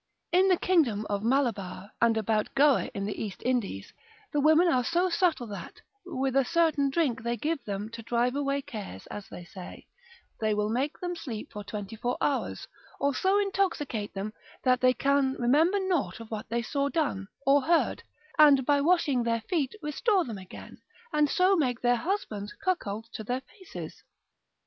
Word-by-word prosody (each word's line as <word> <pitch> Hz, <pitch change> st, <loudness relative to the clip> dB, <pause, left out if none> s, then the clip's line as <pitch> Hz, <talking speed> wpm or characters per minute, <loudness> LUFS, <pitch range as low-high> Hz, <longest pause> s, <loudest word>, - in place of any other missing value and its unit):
In 370 Hz, +2 st, +5 dB
the 370 Hz, -2 st, +4 dB
kingdom 270 Hz, -, +2 dB
of 200 Hz, -1 st, 0 dB
Malabar, 225 Hz, -6 st, -1 dB
and 230 Hz, -1 st, +4 dB
about 215 Hz, -1 st, 0 dB
Goa 280 Hz, -1 st, +4 dB
in 200 Hz, 0 st, -2 dB
the 205 Hz, -, -3 dB
East 205 Hz, -4 st, -7 dB
Indies, 235 Hz, -, -1 dB, 0.4 s
the 295 Hz, -, +2 dB
women 315 Hz, +4 st, +5 dB
are 255 Hz, -7 st, +3 dB
so 350 Hz, +5 st, +1 dB
subtile 335 Hz, -7 st, +1 dB
that, 200 Hz, -, -8 dB, 0.3 s
with 270 Hz, -6 st, -1 dB
a 275 Hz, -, +5 dB
certain 310 Hz, -1 st, +2 dB
drink 270 Hz, -6 st, 0 dB
they 235 Hz, +1 st, -2 dB
give 310 Hz, +1 st, -2 dB
them 200 Hz, 0 st, -3 dB
to 230 Hz, 0 st, -8 dB
drive 240 Hz, +3 st, 0 dB
away 280 Hz, 0 st, -1 dB
cares 200 Hz, -, -8 dB
as 205 Hz, -, -7 dB
they 175 Hz, -, -9 dB
say, 180 Hz, 0 st, -10 dB, 0.5 s
they 215 Hz, -1 st, +1 dB
will 210 Hz, 0 st, 0 dB
make 270 Hz, +6 st, -1 dB
them 355 Hz, -1 st, -3 dB
sleep 240 Hz, -10 st, -6 dB
for 210 Hz, -, -7 dB
twenty 205 Hz, +1 st, -6 dB
four 245 Hz, +3 st, -2 dB
hours, 280 Hz, -2 st, -1 dB, 0.3 s
or 280 Hz, 0 st, +1 dB
so 380 Hz, +8 st, +2 dB
intoxicate 350 Hz, -, -1 dB
them 200 Hz, +2 st, -4 dB, 0.3 s
that 255 Hz, -1 st, +3 dB
they 255 Hz, 0 st, +4 dB
can 275 Hz, -1 st, +2 dB
remember 310 Hz, +11 st, +3 dB
nought 370 Hz, -10 st, -1 dB
of 230 Hz, -1 st, -10 dB
that 215 Hz, -1 st, -5 dB
they 235 Hz, +1 st, -1 dB
saw 280 Hz, +4 st, -1 dB
done, 280 Hz, -, -1 dB, 0.2 s
or 280 Hz, +1 st, +5 dB
heard, 330 Hz, +4 st, +2 dB, 0.4 s
and, 285 Hz, -4 st, +7 dB
by 285 Hz, +1 st, +3 dB
washing 300 Hz, -5 st, +3 dB
of 235 Hz, -, -1 dB
their 230 Hz, -1 st, +1 dB
feet, 300 Hz, -, -1 dB
restore 365 Hz, -, +1 dB
them 220 Hz, -5 st, -6 dB
again, 185 Hz, -1 st, -11 dB, 0.3 s
and 300 Hz, -1 st, +3 dB
so 370 Hz, +5 st, +4 dB
make 255 Hz, -8 st, 0 dB
their 245 Hz, 0 st, +3 dB
husbands 225 Hz, -, -3 dB
cuckolds 225 Hz, -, -2 dB
to 220 Hz, -, -7 dB
their 250 Hz, +4 st, -2 dB
faces. 375 Hz, +6 st, -10 dB
260 Hz, 180 wpm, -28 LUFS, 220-315 Hz, 0.5 s, and